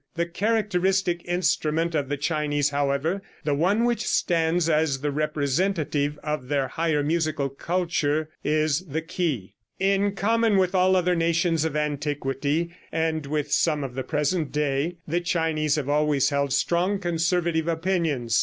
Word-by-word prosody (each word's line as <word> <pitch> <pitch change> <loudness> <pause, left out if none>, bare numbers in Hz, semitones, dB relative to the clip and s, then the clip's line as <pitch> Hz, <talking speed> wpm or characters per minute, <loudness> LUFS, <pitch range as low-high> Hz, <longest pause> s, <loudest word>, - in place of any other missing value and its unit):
The 170 0 0
characteristic 190 -2 0
instrument 170 -2 0
of 145 -3 -1
the 145 - -1
Chinese, 145 -1 0
however, 145 +6 0 0.2
the 150 - 0
one 185 +10 +2
which 240 -2 +1
stands 165 0 +1
as 155 -4 +1
the 145 0 -1
representative 150 0 0
of 150 -1 -2
all 125 - -16
their 140 -2 0
higher 160 -3 0
musical 155 -2 0
culture, 155 0 -1
is 155 -1 +1
the 160 +2 -3
ke. 155 - -2 0.3
In 195 +1 +1
common 225 +1 +2
with 185 0 +2
all 185 0 +4
other 180 -1 +2
nations 165 -1 +1
of 160 -2 -2
antiquity, 145 +1 -1 0.2
and 160 -2 -1
with 150 0 -2
some 150 -3 +2
of 130 -2 -5
the 130 - -3
present 150 +3 -1
day, 150 +3 -1
the 170 +3 0
Chinese 160 -3 0
have 150 -3 -2
always 145 -2 +2
held 140 -1 0
strong 175 +8 +1
conservative 170 -2 0
opinions. 165 - 0
160 Hz, 150 wpm, -25 LUFS, 145-175 Hz, 0.3 s, all